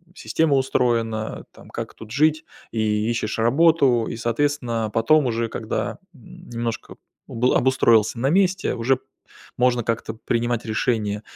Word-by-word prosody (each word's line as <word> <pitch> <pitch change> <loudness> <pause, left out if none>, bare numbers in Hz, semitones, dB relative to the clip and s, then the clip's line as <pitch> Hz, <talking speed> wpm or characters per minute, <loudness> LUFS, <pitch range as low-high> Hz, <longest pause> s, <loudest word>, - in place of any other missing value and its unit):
система 160 -6 +1
устроена, 115 -4 -1
там, - - -16
как - - -6
тут 110 -1 -12
жить 155 +2 +2 0.3
и 110 -1 0
ищешь 115 -2 -2
работу. 135 -1 +3
И, - - -5
соответственно, 120 -2 -1
потом 140 +5 +3
уже, 115 -1 -1
когда, 110 -2 -4 0.2
м, 130 -8 -15
немножко 115 -1 -4 0.3
обл 125 +2 +1
обустроился 115 -4 +3
на 135 +3 +1
месте, 185 +2 +2
уже 125 +3 +1 0.6
можно 125 -1 +2
как-то 115 0 -2
принимать 120 +1 -2
решение 110 -2 -1
120 Hz, 130 wpm, -22 LUFS, 115-135 Hz, 0.6 s, работу